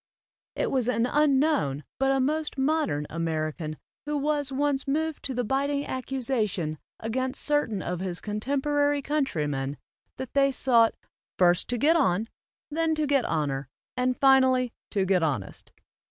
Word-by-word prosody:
It -, -, -1 dB
was 255 Hz, -3 st, +1 dB
an 230 Hz, -1 st, +2 dB
unknown 275 Hz, -, +2 dB, 0.2 s
but 270 Hz, 0 st, +3 dB
a 270 Hz, -, +2 dB
most 300 Hz, +3 st, -1 dB
modern 270 Hz, -, +1 dB
American 155 Hz, -1 st, -2 dB, 0.3 s
who 300 Hz, 0 st, 0 dB
was 290 Hz, -1 st, 0 dB
once 280 Hz, 0 st, 0 dB
moved 315 Hz, +2 st, -1 dB
to 265 Hz, -, -3 dB
the 245 Hz, -, 0 dB
biting 280 Hz, +4 st, 0 dB
accusation 230 Hz, -, -2 dB, 0.2 s
against 255 Hz, +4 st, -2 dB
certain 290 Hz, -10 st, 0 dB
of 175 Hz, 0 st, -3 dB
his 180 Hz, -2 st, -3 dB
contemporary 285 Hz, +6 st, 0 dB
countrymen 150 Hz, -, -1 dB, 0.4 s
that 260 Hz, -, -6 dB
they 275 Hz, 0 st, +4 dB
sought 235 Hz, -3 st, +3 dB, 0.4 s
"first, 175 Hz, -1 st, +3 dB
to 245 Hz, -, -1 dB
get 305 Hz, +8 st, +4 dB
on, 225 Hz, -, +2 dB, 0.4 s
then 320 Hz, +1 st, +1 dB
to 310 Hz, -1 st, 0 dB
get 280 Hz, -3 st, +2 dB
honor, 140 Hz, -4 st, -1 dB, 0.3 s
and 250 Hz, 0 st, 0 dB
finally 260 Hz, -2 st, +4 dB, 0.2 s
to 195 Hz, -3 st, 0 dB
get 190 Hz, -1 st, +2 dB
honest." 135 Hz, -12 st, -3 dB
260 Hz, 145 wpm, -27 LUFS, 180-285 Hz, 0.4 s, they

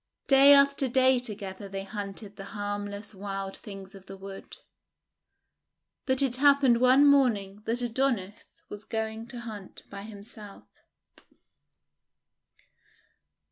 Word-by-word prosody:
Day 275 Hz, +1 st, +7 dB
after 280 Hz, -1 st, +3 dB
day 260 Hz, 0 st, +3 dB
together 200 Hz, -4 st, -7 dB
they 195 Hz, 0 st, -5 dB
hunted 200 Hz, +1 st, -7 dB
the 195 Hz, -, -9 dB
harm 205 Hz, 0 st, -3 dB
less 205 Hz, +1 st, -8 dB
wild 195 Hz, 0 st, -5 dB
things 195 Hz, -2 st, -10 dB
of 195 Hz, -1 st, -14 dB
the 195 Hz, -, -9 dB
wood. 195 Hz, 0 st, -10 dB, 1.5 s
But 260 Hz, +1 st, +4 dB
it 250 Hz, -2 st, 0 dB
happened 275 Hz, -4 st, +4 dB
one 260 Hz, +3 st, +6 dB
morning 220 Hz, -8 st, +2 dB
that 240 Hz, +2 st, -1 dB
Adonis 230 Hz, -5 st, -3 dB
was 210 Hz, 0 st, -9 dB
going 220 Hz, +1 st, -4 dB
to 240 Hz, -1 st, -7 dB
hunt 210 Hz, -5 st, -9 dB
by 200 Hz, 0 st, -7 dB
himself. 205 Hz, 0 st, -11 dB
215 Hz, 120 wpm, -28 LUFS, 200-255 Hz, 1.5 s, Day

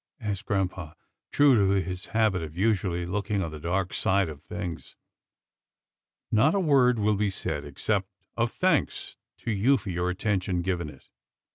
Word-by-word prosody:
asked 105 Hz, 0 st, -4 dB
grampa, 90 Hz, -6 st, -2 dB, 0.4 s
true 145 Hz, -1 st, +5 dB
to 100 Hz, -3 st, +3 dB
his 90 Hz, 0 st, -5 dB
habit 110 Hz, -5 st, +1 dB
of 80 Hz, 0 st, -7 dB
usually 95 Hz, -4 st, +1 dB
looking 100 Hz, +2 st, -1 dB
on 80 Hz, -, -4 dB
the 75 Hz, -, -7 dB
dark 85 Hz, +3 st, -1 dB
side 95 Hz, -2 st, +2 dB
of 75 Hz, -2 st, -9 dB
things. 90 Hz, -2 st, -6 dB, 0.7 s
" -, -, -63 dB
Not 135 Hz, -, +4 dB
a -, -, +3 dB
word 135 Hz, -8 st, +4 dB
will 105 Hz, 0 st, +2 dB
be 105 Hz, 0 st, +1 dB
said, 80 Hz, -6 st, -3 dB
except 95 Hz, +7 st, -1 dB, 0.3 s
of 115 Hz, 0 st, 0 dB
thanks 180 Hz, -6 st, 0 dB, 0.3 s
to -, -, -2 dB
you 115 Hz, +7 st, +3 dB
for 90 Hz, -5 st, -2 dB
attention 95 Hz, -2 st, -1 dB
given 85 Hz, -4 st, -2 dB
it. 70 Hz, -3 st, -15 dB
95 Hz, 160 wpm, -27 LUFS, 90-110 Hz, 0.7 s, true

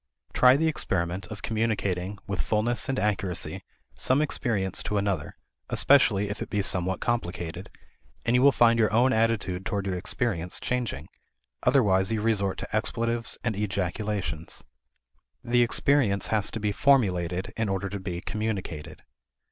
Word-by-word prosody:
Try 125 Hz, 0 st, +6 dB
the 160 Hz, +2 st, +1 dB
experiment 90 Hz, -, -2 dB
of 100 Hz, -1 st, -9 dB
communicating, 105 Hz, -4 st, -1 dB
with 100 Hz, -1 st, -2 dB
fullness 120 Hz, +5 st, 0 dB
and 135 Hz, -, 0 dB
accuracy, 100 Hz, -4 st, -1 dB, 0.3 s
some 130 Hz, -, +1 dB
experience 110 Hz, -10 st, -1 dB
to 105 Hz, 0 st, -2 dB
another, 100 Hz, -6 st, -2 dB, 0.3 s
especially 105 Hz, -8 st, +4 dB
if 100 Hz, -, -5 dB
it -, -, -5 dB
be 105 Hz, -2 st, 0 dB
somewhat 95 Hz, -1 st, +1 dB
complicated, 90 Hz, -9 st, -3 dB, 0.6 s
and 120 Hz, +1 st, +2 dB
you 125 Hz, -, +4 dB
will 140 Hz, +1 st, +7 dB
find 115 Hz, -2 st, +4 dB
your 110 Hz, -, +3 dB
own 125 Hz, +4 st, +3 dB
attitude 110 Hz, -5 st, 0 dB
toward 100 Hz, 0 st, -2 dB
your 95 Hz, -2 st, -1 dB
experience 90 Hz, -2 st, -2 dB
changing; 120 Hz, -, -3 dB, 0.5 s
otherwise 100 Hz, -8 st, +3 dB
you 110 Hz, -, 0 dB
resort 105 Hz, -3 st, 0 dB
to -, -, -5 dB
expletives 115 Hz, +1 st, -1 dB
and 115 Hz, -3 st, -1 dB
ejaculations. 95 Hz, -4 st, -3 dB, 0.8 s
The 120 Hz, 0 st, +2 dB
experience 120 Hz, -4 st, +2 dB
has 105 Hz, -2 st, +1 dB
to 115 Hz, -, -5 dB
be 105 Hz, -1 st, 0 dB
formulated 95 Hz, -8 st, +1 dB
in 110 Hz, -2 st, -1 dB
order 95 Hz, 0 st, -1 dB
to 100 Hz, +1 st, -5 dB
be 90 Hz, -2 st, -5 dB
communicated. 105 Hz, -9 st, -4 dB
105 Hz, 150 wpm, -27 LUFS, 95-115 Hz, 0.8 s, will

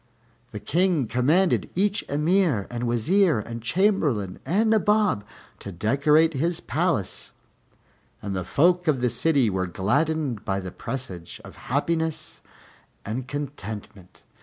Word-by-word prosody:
The 105 Hz, -, -7 dB
King 170 Hz, -, +1 dB
commanded 150 Hz, -, +2 dB
each 200 Hz, +2 st, +1 dB
Emir 150 Hz, -, +2 dB
and 120 Hz, 0 st, -3 dB
Wazir 155 Hz, -, +2 dB
and 115 Hz, +2 st, -6 dB
Chamberlain 135 Hz, -, 0 dB
and 220 Hz, +5 st, +2 dB
Nabob 210 Hz, -, +2 dB, 0.4 s
to 100 Hz, -, -7 dB
decorate 145 Hz, -, +3 dB
his 165 Hz, +5 st, -1 dB
palace, 155 Hz, -, -2 dB, 0.9 s
and 100 Hz, -2 st, -5 dB
the 95 Hz, -, -2 dB
folk 175 Hz, -, +2 dB
of 140 Hz, -5 st, +2 dB
the 125 Hz, -1 st, +1 dB
city 145 Hz, -7 st, +2 dB
were 95 Hz, -2 st, -1 dB
gladdened 130 Hz, -, 0 dB
by 95 Hz, -2 st, -1 dB
the 95 Hz, -1 st, -6 dB
presage 95 Hz, -12 st, -6 dB
of -, -, -12 dB
happiness 160 Hz, +4 st, -2 dB, 0.6 s
and 120 Hz, +5 st, -4 dB
contentment. 110 Hz, -10 st, -7 dB
140 Hz, 125 wpm, -25 LUFS, 110-170 Hz, 0.9 s, decorate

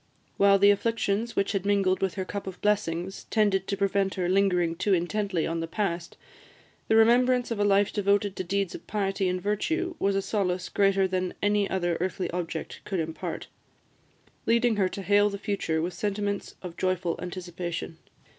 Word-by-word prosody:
While 200 Hz, 0 st, +6 dB
the 200 Hz, +1 st, +6 dB
afflictions 225 Hz, +1 st, 0 dB
which 200 Hz, -, +1 dB
had 195 Hz, -3 st, -1 dB
mingled 200 Hz, -2 st, +2 dB
with 190 Hz, -2 st, 0 dB
her 190 Hz, -2 st, -3 dB
cup 200 Hz, +1 st, -5 dB
of 190 Hz, -, -7 dB
blessings 190 Hz, -3 st, -1 dB
tended 200 Hz, -4 st, +1 dB
to 200 Hz, -, -2 dB
prevent 195 Hz, -1 st, +1 dB
her 180 Hz, -2 st, -1 dB
lingering 180 Hz, -3 st, +2 dB
too 195 Hz, +3 st, +2 dB
intently 185 Hz, 0 st, -1 dB
on 165 Hz, 0 st, -2 dB
the 165 Hz, -, -3 dB
past, 170 Hz, -2 st, -3 dB, 0.7 s
the 220 Hz, -, +3 dB
remembrance 245 Hz, +2 st, +4 dB
of 225 Hz, -, -2 dB
a -, -, +3 dB
life 200 Hz, 0 st, +3 dB
devoted 200 Hz, -1 st, +1 dB
to -, -, -3 dB
deeds 195 Hz, 0 st, -1 dB
of -, -, -10 dB
piety 195 Hz, -2 st, 0 dB
and 180 Hz, 0 st, -1 dB
virtue 320 Hz, -, -1 dB
was 195 Hz, 0 st, +1 dB
a 195 Hz, -, +1 dB
solace 185 Hz, -4 st, -1 dB
greater 195 Hz, -1 st, +3 dB
than 185 Hz, -1 st, -2 dB
any 205 Hz, 0 st, +2 dB
other 175 Hz, -3 st, 0 dB
earthly 185 Hz, 0 st, -2 dB
object 170 Hz, -2 st, -5 dB
could 190 Hz, -3 st, -3 dB
impart, 160 Hz, 0 st, -4 dB, 1.0 s
leading 235 Hz, 0 st, +3 dB
her 190 Hz, -2 st, +2 dB
to 195 Hz, -, -6 dB
hail 205 Hz, +1 st, +4 dB
the 200 Hz, -, -5 dB
future 195 Hz, -6 st, -1 dB
with 175 Hz, +1 st, -3 dB
sentiments 205 Hz, +2 st, -3 dB
of 175 Hz, -2 st, -7 dB
joyful 185 Hz, -2 st, 0 dB
anticipation. 175 Hz, -2 st, -5 dB
195 Hz, 180 wpm, -27 LUFS, 180-205 Hz, 1.0 s, While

